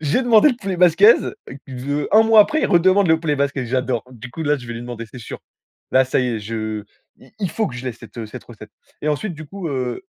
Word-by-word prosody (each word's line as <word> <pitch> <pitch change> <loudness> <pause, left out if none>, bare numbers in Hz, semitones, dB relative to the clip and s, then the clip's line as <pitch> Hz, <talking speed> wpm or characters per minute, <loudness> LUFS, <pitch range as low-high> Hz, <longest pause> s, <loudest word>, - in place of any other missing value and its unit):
J'ai 160 - +1
demandé 240 +3 +5
le 245 - -4
poulet 190 -3 -3
basquaise, 180 +5 +5 0.3
heu, 140 +3 -3
un 220 +1 +7
mois 220 -1 +6
après, 310 +9 +2
il - - +2
redemande 185 +1 +3
le 160 0 +4
poulet 150 -3 -1
basquaise, 140 -3 -2
j'adore. 125 -2 -1
Du 125 +1 -10
coup, 160 - -6
là, 150 0 +1
je 120 -3 -11
vais 120 - -6
lui 115 - -6
demander, 120 -1 -7
c'est 125 - -10
sûr. 115 - -8 0.5
Là, 130 0 +4
ça 130 - 0
y 125 - 0
est, - - -6
je 110 -1 -4 0.3
il - - -20
il 190 -5 -2
faut 220 +6 -1
que 120 - -9
je 125 - -8
l'ai, 125 - -3
cette, 115 -1 -15
heu, 110 - -5
cette 125 +4 -10
recette. 105 -3 -13 0.3
Et 150 - -1
ensuite, 165 +5 -2
du 155 0 -10
coup, 190 0 -6
heu 130 - -3
140 Hz, 260 wpm, -20 LUFS, 120-185 Hz, 0.5 s, un